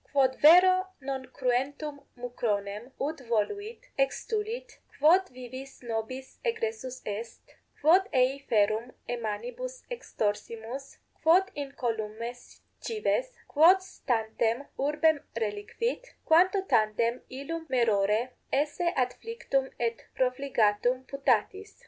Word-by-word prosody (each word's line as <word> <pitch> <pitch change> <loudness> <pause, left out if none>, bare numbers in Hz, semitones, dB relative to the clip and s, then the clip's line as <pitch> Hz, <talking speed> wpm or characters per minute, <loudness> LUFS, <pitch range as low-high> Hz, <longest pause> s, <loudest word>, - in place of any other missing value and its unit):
Quod 265 -2 +3
vero 370 +4 +7
non 265 0 -3
2 260 - -15
cruentum 280 +3 -1 0.2
mucronem, 225 -2 -3
ut 305 +3 -2
voluit, 405 - -2 0.2
extulit, 440 - -2 0.2
quod 355 +6 +5
vivis 255 +1 -10
nobis 235 +3 -5
egressus 450 - -3
est, 220 +3 -6 0.3
quod 370 +7 +5
ei 260 +2 +3
ferrum 220 +3 +2
e 245 - -1
manibus - - -5
extorsimus, 230 - -4 0.2
quod 365 +5 +5
incolumes 235 -4 -4 0.2
cives, 470 +3 0 0.2
quod 330 +6 +7
stantem 230 -5 -1
urbem 300 +2 +3 0.2
reliquit, 230 - -3
quanto 370 +4 +5
tandem 230 - +2
illum 320 +5 -5
maerore 225 -1 +2 0.2
esse 295 +5 0
adflictum 270 - -1
et 230 -1 -2
profligatum 250 -2 +1
putatis? 275 - 0
265 Hz, 100 wpm, -29 LUFS, 230-345 Hz, 0.3 s, vero